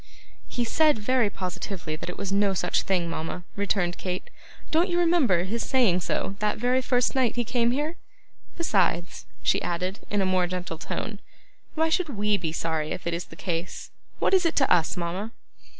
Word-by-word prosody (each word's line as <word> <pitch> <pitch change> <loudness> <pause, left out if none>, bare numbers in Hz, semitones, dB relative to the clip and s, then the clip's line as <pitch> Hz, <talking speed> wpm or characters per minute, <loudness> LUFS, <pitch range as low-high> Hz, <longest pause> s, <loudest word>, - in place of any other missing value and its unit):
'He 240 - -1
said 305 +3 +4
very 235 +1 +2
positively 185 -4 -4
that 155 - -6
it 180 - -6
was 195 - -3
no 200 -1 +3
such - - +1
thing, 180 -3 0
mama,' 165 +2 -4
returned 195 -3 0
Kate. 180 -1 -4 0.4
'Don't 335 +4 +3
you 350 - +1
remember 330 - +4
his 225 +5 -2
saying 235 -10 +3
so 195 +3 -1
that 210 0 0
very 250 +3 +2
first 250 -1 +2
night 255 -4 +2
he 240 - +1
came 235 0 +1
here? 300 +7 -1 0.6
Besides,' 190 - +1 0.2
she - - +3
added, 180 +3 -2
in 205 - +1
a 195 - +2
more 185 -1 +2
gentle 180 -2 -4
tone, 210 +2 -4 0.6
'why 320 0 +2
should 345 0 +1
WE 210 0 +2
be 165 -4 -2
sorry 160 -1 -1
if - - -7
it 170 - 0
is 170 +1 -2
the - - -13
case? 170 -1 -4 0.3
What - - +1
is 375 -1 +5
it 335 - +1
to 270 - +4
us, 170 -1 +2
mama? 180 +6 -3
200 Hz, 190 wpm, -26 LUFS, 180-250 Hz, 0.6 s, is